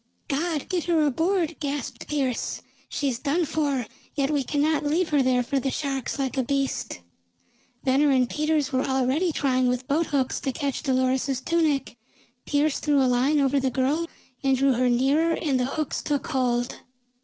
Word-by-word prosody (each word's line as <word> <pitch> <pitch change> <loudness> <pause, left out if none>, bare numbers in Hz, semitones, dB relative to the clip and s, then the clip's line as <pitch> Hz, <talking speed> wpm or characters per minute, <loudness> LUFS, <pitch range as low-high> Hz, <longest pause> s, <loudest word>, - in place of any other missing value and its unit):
"God! 305 +1 -1
Get 355 -3 -1
her 330 -3 +3
aboard!" 330 +3 0
gasped 280 -4 -4
Pearse. 270 -5 -2 0.3
"She's 265 -5 -1
done 310 +5 +1
for. 285 -5 -1 0.3
Yet 280 0 +1
we 290 -2 +1
cannot 295 +3 +1
leave 320 +4 +1
her 290 -2 +3
there 255 -1 +2
for 275 +3 0
the 270 - -1
sharks, 270 -1 -3
like 270 -1 -2
a - - +2
beast!" 275 - -2 0.8
Venner 275 +2 +3
and 255 -2 +3
Peters 305 0 0
were 260 - +2
already 265 +6 +1
trying 255 -4 +1
with 250 +1 -1
boat 310 +4 +1
hooks 270 -3 0
to 270 - -2
catch 280 0 -3
Dolores's 260 -1 +1
tunic. 300 -5 0 0.5
Pearse 290 0 +1
threw 295 -2 +2
a 265 - +4
line 255 +4 +2
over 275 0 +2
the 265 0 +1
girl 270 +7 0 0.4
and 270 -1 +3
drew 275 0 +3
her 250 +1 +2
nearer 285 +7 +2
and 275 -5 0
the 250 - +1
hooks 300 +2 -2
took 290 -2 -1
hold. 245 -3 -1
275 Hz, 175 wpm, -25 LUFS, 260-300 Hz, 0.8 s, a